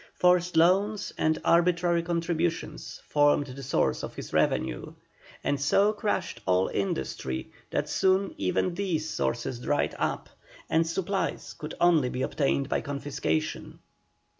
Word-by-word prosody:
Forced 180 -1 +3
loans 195 +5 +3
and 155 0 +1
arbitrary 175 0 +3
contributions 165 -2 -2
formed 145 -1 +3
the 135 0 -9
sources 135 +1 0
of - - -6
his - - -8
revenue, - - 0 0.5
and 145 -1 0
so 200 +9 +3
crushed 210 - -2
all 90 0 +3
industry 65 -8 -3 0.2
that - - -1
soon 190 +1 +2
even 100 - 0
these 170 -4 -1
sources 70 - -2
dried 145 +4 0
up, - - -1 0.4
and 165 0 +3
supplies 190 +3 -2
could 155 -1 -7
only 165 -7 +4
be 130 +1 -3
obtained 140 -1 0
by - - 0
confiscations. 140 - -3
160 Hz, 130 wpm, -28 LUFS, 135-180 Hz, 0.5 s, only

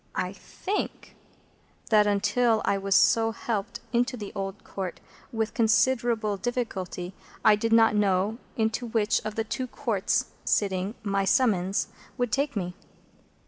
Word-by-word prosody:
I - - -2
think 405 +2 -5 0.8
that, 210 -1 +6
until 215 +3 +2
I 200 - +2
was 195 0 0
so 225 +3 +4
helped 220 -3 -3
into 245 +2 +1
the 205 -3 -6
Old 195 0 -5
Court 190 -3 -5 0.3
with 225 -2 -2
considerable 235 -2 +2
difficulty, 195 -6 -3 0.3
I 215 - +8
did 225 +2 -2
not 225 -1 +5
know 205 +2 +1 0.2
into 225 +2 0
which 220 -2 +1
of 215 -1 -4
the 225 - 0
two 255 +3 -3
Courts 225 -6 -1
sitting 195 +1 0
my 200 -1 +1
summons 195 -5 +2 0.3
would 245 -2 0
take 280 +1 0
me. 180 -3 -2
215 Hz, 140 wpm, -27 LUFS, 195-235 Hz, 0.8 s, I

